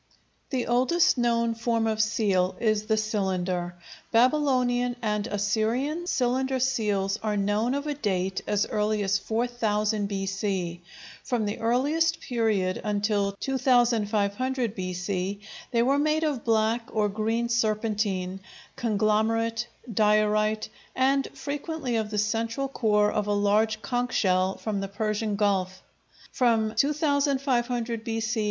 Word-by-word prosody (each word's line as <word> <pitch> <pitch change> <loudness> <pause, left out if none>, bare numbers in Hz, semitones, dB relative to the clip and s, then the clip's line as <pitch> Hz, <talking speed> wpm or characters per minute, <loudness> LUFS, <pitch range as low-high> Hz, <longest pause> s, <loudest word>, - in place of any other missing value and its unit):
The 255 -3 -1
oldest 255 +8 +3
known 235 -2 +1
form 230 0 0
of 220 -1 +1
seal 200 -4 +1
is 215 -2 +1
the 220 -1 +2
cylinder. 185 -4 -1 0.4
Babylonian 245 -1 +2
and 210 -1 -1
Assyrian 235 - -1
cylinder 260 -1 0
seals 210 -6 0
are 215 -1 -1
known 210 +5 +1
of 285 +1 -3
a 300 - -1
date 190 -8 -1
as 205 0 +1
early 210 -1 0
as 195 0 +1
4000 220 -2 -1
B.C. 195 -3 -3 0.4
From 240 -5 -1
the 205 - -3
earliest 295 +8 +1
period 215 -7 0
until 205 -1 0
2500 240 -1 +1
B.C. 185 +1 -3 0.3
they 235 -2 +2
were 275 +3 +2
made 310 +2 +1
of 290 -7 -1
black 225 +1 +1
or 215 -1 +1
green 225 +3 -1
serpentine, 210 -5 -1 0.4
conglomerate, 225 +1 +1 0.3
diorite, 215 +1 +2 0.3
and 270 +1 +2
frequently 290 -2 -4
of 220 -1 -2
the 210 - -3
central 230 +5 -1
core 210 -5 +2
of 210 -1 -1
a 205 - +1
large 215 +2 +1
conch 245 +2 -1
shell 185 -1 +2
from 210 -2 -3
the 195 - -3
Persian 215 +1 -2
Gulf. 190 -2 0 0.5
From 225 -3 +2
2500 265 -4 0
B.C. 225 0 -2
220 Hz, 125 wpm, -26 LUFS, 205-245 Hz, 0.5 s, oldest